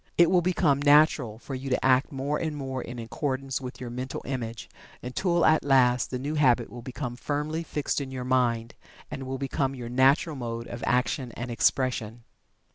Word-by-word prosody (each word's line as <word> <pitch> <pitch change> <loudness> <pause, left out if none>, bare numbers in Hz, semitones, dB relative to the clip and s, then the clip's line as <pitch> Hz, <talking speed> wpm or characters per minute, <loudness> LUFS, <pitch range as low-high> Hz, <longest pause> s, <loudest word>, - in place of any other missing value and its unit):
It 170 0 +6
will 180 -1 +5
become 165 -5 +2
"natural" 145 -6 +4
for 135 - -8
you 135 +1 -4
to 125 - 0
act 130 +4 +3
more 140 +2 -2
and 155 -2 -2
more 130 -2 -4
in 120 0 -7
accordance 135 +3 -3
with 125 0 -7
your 125 -2 -6
mental 125 +2 -5
image, 120 -4 -4 0.4
until 170 +7 +1
at 155 -1 +4
last 125 -3 +3
the 130 - -3
new 140 +4 -3
habit 125 -6 +3
will 120 - -8
become 125 0 -5
firmly 150 +5 -2
fixed 150 -3 -2
in 135 - -5
your 130 -1 -5
mind, 120 -3 +1 0.4
and 135 -1 -5
will 135 0 -3
become 135 0 -1
your 120 -2 -6
natural 135 +5 +3
mode 115 -2 -4
of 120 0 -7
action 125 +1 0
and 120 +1 -5
expression. 120 -2 0
130 Hz, 190 wpm, -27 LUFS, 125-145 Hz, 0.4 s, It